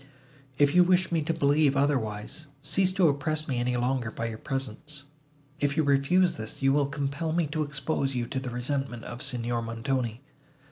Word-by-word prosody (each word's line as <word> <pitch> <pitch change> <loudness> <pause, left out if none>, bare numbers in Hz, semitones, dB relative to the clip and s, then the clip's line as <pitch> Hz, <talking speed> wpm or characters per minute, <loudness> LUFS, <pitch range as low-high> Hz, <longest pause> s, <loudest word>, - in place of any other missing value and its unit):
If 145 0 +4
you 180 - +7
wish 180 0 +2
me 165 -2 +2
to 155 - -1
believe 145 -2 +3
otherwise, 135 0 -1
cease 190 +6 +2
to 185 -3 +4
oppress 155 +2 0
me 125 -3 -1
any 125 0 0
longer 125 -1 0
by 115 +1 -4
your 110 -1 -7
presence. 135 +3 -4 0.6
If 145 0 0
you 160 - +4
refuse 145 +6 +3
this, 110 0 -5
you 135 0 +4
will 145 -1 +2
compel 140 +3 -2
me 170 -1 +2
to 155 +1 -2
expose 140 -2 -1
you 120 -1 -1
to 130 +3 -3
the 130 -1 -5
resentment 125 -1 -3
of 120 +1 -7
Signor 120 -3 -2
Montoni." 115 +1 -2
140 Hz, 185 wpm, -28 LUFS, 125-155 Hz, 0.6 s, you